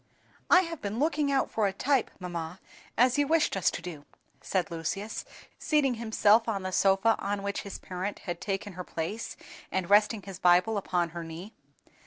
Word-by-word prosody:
"I 360 - +8
HAVE 335 -4 -6
been 205 +2 -3
looking 295 0 +1
out 270 -1 +1
for 215 -2 +1
a - - 0
type, 265 +5 +1
mamma, 175 -1 -5 0.4
as 250 +3 +4
you 290 - +3
wished 320 -5 +2
us 185 -2 +3
to - - -6
do," 160 -5 -7 0.4
said 180 -4 -1
Lucius, 185 +6 -4 0.3
seating 295 -4 +2
himself 220 0 +4
on 200 -3 -2
the 185 - -3
sofa 195 +4 +3
on 200 0 -2
which 200 0 -2
his 200 - -7
parent 185 +2 -5
had 175 -2 -4
taken 195 0 -3
her 180 +1 -6
place, 175 +8 -5 0.3
and 190 0 -2
resting 210 0 +4
his 195 -2 -8
Bible 180 +5 +4
upon 175 -3 0
her 170 +1 -6
knee. 165 +7 -8
200 Hz, 185 wpm, -29 LUFS, 180-230 Hz, 0.4 s, I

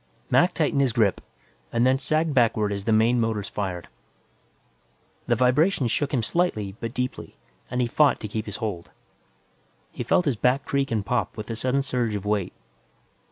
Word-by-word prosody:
Mac 175 +1 +4
tightened 145 -3 +1
his 130 -4 +1
grip, 110 -6 +2 0.5
and 120 - +2
then 130 +1 +3
sagged 155 +2 0
backward 110 -5 +2
as 100 -1 -4
the 115 - +1
main 115 +3 +3
motors 110 -3 -1
fired. 95 -4 -4 1.4
The - - +3
vibrations 130 - +2
shook 140 +5 0
him 125 -5 0
slightly 110 - -1
but 115 - -4
deeply, 125 0 -4 0.3
and 125 +1 -1
he - - +2
fought 145 +4 +3
to 105 - -4
keep 110 +1 -4
his 105 - -4
hold. 100 -6 -4 1.0
He - - -7
felt 180 - +2
his 140 -5 +1
back 125 +5 +1
creak 140 -1 0
and 110 -3 -1
pop 120 -4 -1
with 110 - -5
the 115 - -5
sudden 130 +4 0
surge 120 -5 -1
of 100 -1 -5
weight. 105 -3 -1
120 Hz, 180 wpm, -25 LUFS, 105-135 Hz, 1.4 s, Mac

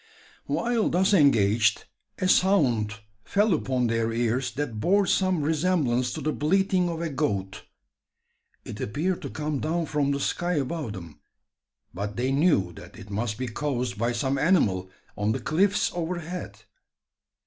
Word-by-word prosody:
While 235 -2 0
thus 190 +4 +2
engaged, 110 - +3 0.3
a 185 - 0
sound 120 - +2 0.2
fell 205 0 +2
upon 130 -5 0
their 115 0 0
ears 120 +2 0
that 130 -6 -3
bore 195 - +3
some 185 -4 +1
resemblance 150 -6 +1
to - - -5
the 155 - -1
bleating 185 +3 +1
of 165 -1 -4
a 165 - -2
goat. 100 -9 -2 1.0
It - - -7
appeared 170 - -1
to - - -5
come 150 -2 -3
down 165 +3 -1
from 145 -2 0
the 140 0 0
sky 175 +5 -1
above 145 -5 -2
them; 85 -6 -10 0.7
but 100 +3 -4
they 125 +2 0
knew 135 - +2
that - - -13
it 100 - -11
must 105 +1 -2
be 130 +1 -3
caused 125 -2 -3
by 120 +1 +1
some 130 +3 -1
animal 100 - +2 0.3
on 105 +1 0
the - - -2
cliffs 195 +6 +1
overhead. 170 - -5
140 Hz, 150 wpm, -26 LUFS, 115-175 Hz, 1.0 s, engaged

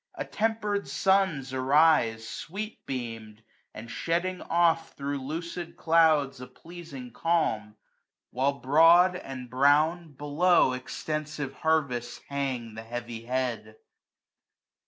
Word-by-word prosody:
Attemper'd 215 -6 -1
suns 190 -9 +1
arise, 130 -4 +3
Sweet 210 - -6
beam'd, 115 -4 -6 0.3
and 115 +2 -9
shedding 180 +2 -2
oft 165 -1 +1
thro' 140 0 -3
lucid 165 +5 -6
clouds 155 -5 +3
A 125 - -8
pleaiing 140 -4 -11
calm; 115 -8 0 0.6
while 140 +2 +1
broad, 165 +7 +5
and 130 -7 -7
brown, 150 +6 +2
below 145 +3 +3
3^ - - -2
Extensive 150 +1 -5
harvests 140 -7 -1
hang 130 -5 -3
the 110 - -7
heavy 115 0 -7
head. 120 -4 -3
145 Hz, 105 wpm, -27 LUFS, 125-170 Hz, 0.6 s, broad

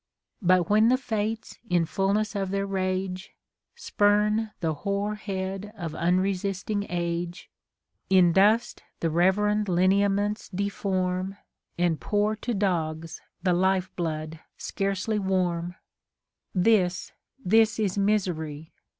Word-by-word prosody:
But 180 -2 +3
when 215 +2 +4
the 255 +2 +4
Fates, 220 -3 -3
in 175 -2 +2
fulness 200 +5 0
of 195 -2 -1
their 195 +1 -1
rage, 185 -1 -3 0.4
Spurn 210 - +2
tiie 160 -3 -1
hoar 200 +3 -1
head 195 -1 -4
of 165 -4 -5
unresisting 195 +4 0
age, 170 0 -3 0.6
In 185 -2 +5
dust 210 +5 +3 0.2
the 165 - 0
reverend 205 +5 +2
lineaments 200 +3 +2
deform, 190 -1 -2 0.4
And 175 -2 +1
pour 210 +1 +1
to 235 +2 -3
dogs 165 -4 -2 0.2
the 185 -1 +3
life 190 +1 +1
blood 155 -2 -3 0.2
scarcelj' 195 +2 -2
warm: 180 -3 -1 0.8
This, 185 -2 +2 0.3
this 225 -1 +3
is 205 -4 0
misery 175 -7 -1
190 Hz, 110 wpm, -26 LUFS, 175-205 Hz, 0.8 s, In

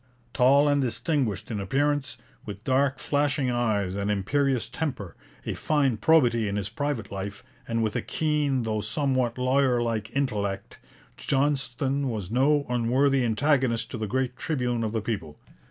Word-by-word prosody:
Tall 140 +4 +5
and 145 -1 +3
distinguished 125 - -1
in 105 - -2
appearance, 140 +5 0 0.3
with 105 0 -8
dark 135 +1 +2
flashing 145 -2 0
eyes 110 -6 0
and 100 +1 -2
imperious 130 +6 +1
temper, 125 - -4 0.3
of - - -4
fine 140 -6 +1
probity 120 -4 +3
in 100 - -2
his 100 -1 -2
private 125 -3 -3
life, 100 +1 -6 0.2
and 115 -1 0
with 110 -1 -1
a - - 0
keen, 150 -5 0
though 110 -1 -1
somewhat 130 +1 0
lawyer 130 0 +2
like, 115 -2 -2
intellect, 105 -8 -2 0.4
Johnston 140 -1 0
was 105 -5 -4
no 140 +4 +3
unworthy 125 +3 +2
antagonist 125 0 +1
to 120 - -5
the 110 - -2
great 130 +2 -1
tribune 125 -7 -1
of 110 - -1
the 110 -1 -1
people. 90 -9 -4
125 Hz, 155 wpm, -26 LUFS, 110-140 Hz, 0.4 s, Tall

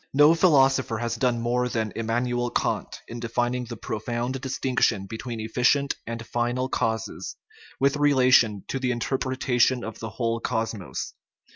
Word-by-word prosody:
No 150 +3 +7
philosopher 135 - +3
has 115 0 -2
done 120 -1 +1
more 125 +1 +1
than 110 -3 -2
Immanuel 120 +2 -1
Kant - - -2
in 120 - -7
defining 120 +1 -1
the 120 -1 -7
profound 120 +5 -3
distinction 130 -6 0
between 115 +3 -6
efficient 125 +5 +1
and 115 0 -5
final 120 +3 -1
causes, 110 -4 -2 0.4
with 140 +1 +2
relation 130 -8 +4
to 135 - -2
the 130 -1 -1
interpretation 125 0 +1
of 115 0 -7
the 115 - -5
whole 115 +1 -1
cosmos. 110 -5 -3
120 Hz, 140 wpm, -25 LUFS, 115-130 Hz, 0.4 s, No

